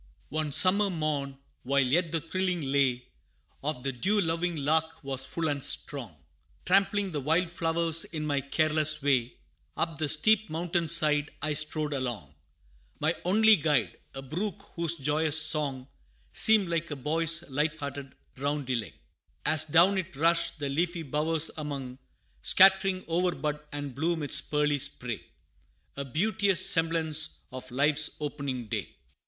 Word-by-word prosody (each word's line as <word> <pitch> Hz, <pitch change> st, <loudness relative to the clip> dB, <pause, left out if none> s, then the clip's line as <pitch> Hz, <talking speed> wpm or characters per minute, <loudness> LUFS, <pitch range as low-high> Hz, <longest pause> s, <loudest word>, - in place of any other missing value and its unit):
One 155 Hz, 0 st, -2 dB
summer 200 Hz, +7 st, +4 dB
morn, 150 Hz, -5 st, -2 dB, 0.2 s
while 140 Hz, +2 st, +2 dB
yet 160 Hz, +6 st, +1 dB
the 165 Hz, -, 0 dB
thrilling 180 Hz, +1 st, -2 dB
lay, 135 Hz, -3 st, +1 dB, 0.6 s
Of 140 Hz, -4 st, -3 dB
the 135 Hz, -, -1 dB
dew 190 Hz, -, 0 dB
loving 170 Hz, -1 st, -1 dB
lark 160 Hz, +2 st, -1 dB
was 135 Hz, -1 st, -3 dB
full 165 Hz, -1 st, -2 dB
and 145 Hz, -3 st, -2 dB
strong, -, -, -2 dB, 0.5 s
Trampling 195 Hz, +1 st, +2 dB
the 150 Hz, -, -3 dB
wild 165 Hz, +5 st, +1 dB
flowers 165 Hz, -1 st, 0 dB
in 155 Hz, -2 st, -5 dB
my 145 Hz, -2 st, 0 dB
careless 155 Hz, +1 st, +1 dB
way, 130 Hz, -4 st, +1 dB, 0.4 s
Up 165 Hz, -3 st, -2 dB
the 155 Hz, -2 st, 0 dB
steep 215 Hz, +8 st, +3 dB
mountain 170 Hz, +1 st, -2 dB
side 150 Hz, -2 st, +3 dB
I 155 Hz, +1 st, -1 dB
strode 155 Hz, 0 st, +1 dB
along 120 Hz, -, -4 dB, 0.7 s
My 155 Hz, +2 st, +2 dB
only 220 Hz, +4 st, +5 dB
guide, 150 Hz, -4 st, 0 dB, 0.2 s
a 135 Hz, -, -6 dB
brook 200 Hz, +8 st, -5 dB
whose 170 Hz, -1 st, +1 dB
joyous 150 Hz, +1 st, +1 dB
song, 145 Hz, -4 st, +2 dB, 0.5 s
Seemed 215 Hz, -3 st, +4 dB
like 170 Hz, -1 st, -2 dB
a 145 Hz, -, -4 dB
boy's 165 Hz, +4 st, -1 dB
light 150 Hz, +3 st, -1 dB
hearted 140 Hz, -3 st, -7 dB, 0.2 s
roundelay, 130 Hz, -, -2 dB, 0.5 s
As 155 Hz, -1 st, +2 dB
down 175 Hz, +5 st, +4 dB
it 185 Hz, -4 st, -6 dB
rushed, 165 Hz, +4 st, +2 dB
the 145 Hz, -2 st, -3 dB
leafy 170 Hz, +4 st, -1 dB
bowers 155 Hz, +2 st, 0 dB
among, 135 Hz, -4 st, -6 dB, 0.4 s
Scattering 190 Hz, -, +4 dB
o'er 175 Hz, +2 st, 0 dB
bud 150 Hz, +1 st, -3 dB
and 145 Hz, -2 st, -5 dB
bloom 160 Hz, +4 st, -1 dB
its 145 Hz, -, +1 dB
pearly 150 Hz, -1 st, 0 dB
spray 125 Hz, -5 st, -4 dB, 0.7 s
A 140 Hz, -, -4 dB
beauteous 190 Hz, -, +2 dB
semblance 160 Hz, -1 st, +1 dB
of 130 Hz, 0 st, -8 dB
life's 145 Hz, +4 st, +2 dB
opening 140 Hz, -4 st, -4 dB
day. 105 Hz, -, -4 dB
155 Hz, 145 wpm, -28 LUFS, 140-170 Hz, 0.7 s, only